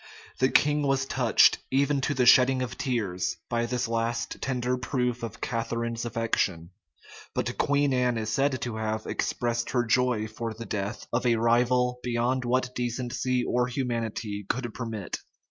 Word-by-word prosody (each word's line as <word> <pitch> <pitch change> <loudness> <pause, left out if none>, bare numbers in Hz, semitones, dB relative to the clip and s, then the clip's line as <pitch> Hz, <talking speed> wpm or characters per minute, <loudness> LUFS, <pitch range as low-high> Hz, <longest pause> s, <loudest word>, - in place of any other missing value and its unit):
[*] - - -21
The 130 - +4
king 150 +1 +3
was 135 -1 +1
touched, 125 -4 +4
even 140 +1 +2
to 145 - 0
the 125 -1 +2
shedding 130 +1 +6
of 115 -6 -5
tears, 100 -8 -1
by 120 -1 0
this 125 0 -1
last 115 +1 -2
tender 125 -1 0
proof 125 -1 -1
of 115 -2 -6
Catharine's 115 0 -2
affection; 105 -7 -1 0.6
but - - -1
Queen 145 -1 +2
Anne 125 -2 +1
is 110 -1 -2
said 135 0 +1
to 120 -3 -3
have 110 0 -2
expressed 120 -1 -1
her 120 -1 +1
joy 120 -1 +2
for 110 +1 -5
the 115 +1 -7
death 100 +1 -4
of 120 - +1
a 120 - +4
rival 125 +2 +2
beyond 125 +1 0
what 125 +1 0
decency 125 +1 -1
or 125 0 +1
humanity 115 -5 -3
could 120 -3 -2
permit. 110 -7 -5
120 Hz, 165 wpm, -27 LUFS, 115-125 Hz, 0.6 s, shedding